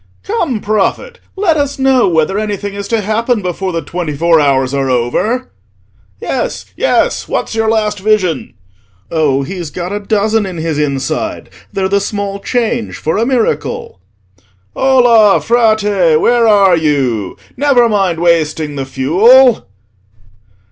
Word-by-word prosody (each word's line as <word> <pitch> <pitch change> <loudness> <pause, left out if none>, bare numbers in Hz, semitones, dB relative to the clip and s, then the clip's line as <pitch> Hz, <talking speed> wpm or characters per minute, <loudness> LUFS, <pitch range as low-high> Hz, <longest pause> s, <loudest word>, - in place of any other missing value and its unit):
"Come 335 - -2
Prophet, 215 - -2 0.2
let 375 -5 +1
us 285 -1 -2
know 265 -6 +3
whether 165 +4 0
anything 205 -1 -4
is 200 0 -6
to 225 0 0
happen 220 +2 -1
before 185 +1 -3
the 165 -2 -3
twenty 155 -2 -5
four 170 +1 +3
hours 135 -2 +1
are 135 -1 -1
over!" 130 - -1 0.7
"Yes, 255 - -3
yes, - - 0
what's - - -3
your 225 0 0
last 215 -2 0
vision?" 190 - 0 0.6
"Oh, 145 -4 +1
he's 175 +1 -6
got 180 +3 -6
a 205 - -3
dozen 210 +1 0
in 180 -2 -7
his 160 -2 -2
inside; 135 -3 -3 0.2
they're 190 -1 -1
the 200 +1 +1
small 200 -1 -4
change 235 +1 -2
for 160 +6 -2
a 230 - 0
miracle!" 245 - -2 0.8
"Ola, 245 -6 +4
Frate, 210 -8 +2
where 235 +3 +2
are 200 -4 +5
you? 135 - -1 0.2
Never 255 -3 +3
mind 195 -6 0
wasting 155 -3 0
the 135 - -3
fuel!" 215 - +4
200 Hz, 140 wpm, -13 LUFS, 160-230 Hz, 0.8 s, are